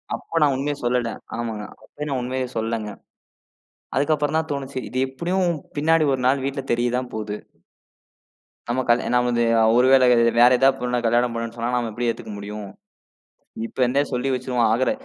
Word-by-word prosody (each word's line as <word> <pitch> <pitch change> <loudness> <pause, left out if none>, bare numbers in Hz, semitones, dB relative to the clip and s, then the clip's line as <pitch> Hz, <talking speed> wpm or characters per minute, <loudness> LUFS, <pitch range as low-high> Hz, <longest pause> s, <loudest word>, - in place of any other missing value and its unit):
அப்ப 165 - -3
நான் 145 -2 +3
உண்மைய 145 +2 -2
சொல்லிட்டேன். 120 -1 -1 0.2
ஆமாங்க. 110 -3 -4 0.2
அப்பயும் 150 0 -7
நான் 130 -2 -1
உண்மையை 130 +1 -2
சொல்லங்க. 110 -1 -2 1.1
அதுக்கப்புறம்தான் 150 +2 +1
தோணுச்சு, 135 -1 -4
இது 130 - -4
எப்புடியும் 175 +6 0 0.3
பின்னாடி 160 0 +3
ஒரு 130 - -3
நாள் 135 +1 +2
வீட்ல 140 0 -3
தெரியதான் 120 +1 0
போது. 105 -1 -4 1.4
நம்ம 120 +2 0
கல்யா 120 +1 +3
நான் 125 0 +3
வந்து 120 -1 +1 0.3
ஒருவேள 130 +1 +5 0.4
வேற 120 +1 +8
ஏதாவது 135 +2 +4
பொண்ண 125 0 0
கல்யாணம் 120 +1 +2
பண்ணும்னு 115 0 -4
சொன்னா, 115 +1 -2
நாம 120 -2 -1
எப்படி 120 +2 -2
ஏத்துக்க 110 - -5
முடியும்? 105 0 -7 1.0
இப்ப - - -16
இந்தே 140 +3 +2
சொல்லி 125 +2 -1
வச்சிருவோம். 125 -1 0
ஆகற 125 +3 +2
125 Hz, 155 wpm, -22 LUFS, 120-140 Hz, 1.4 s, வேற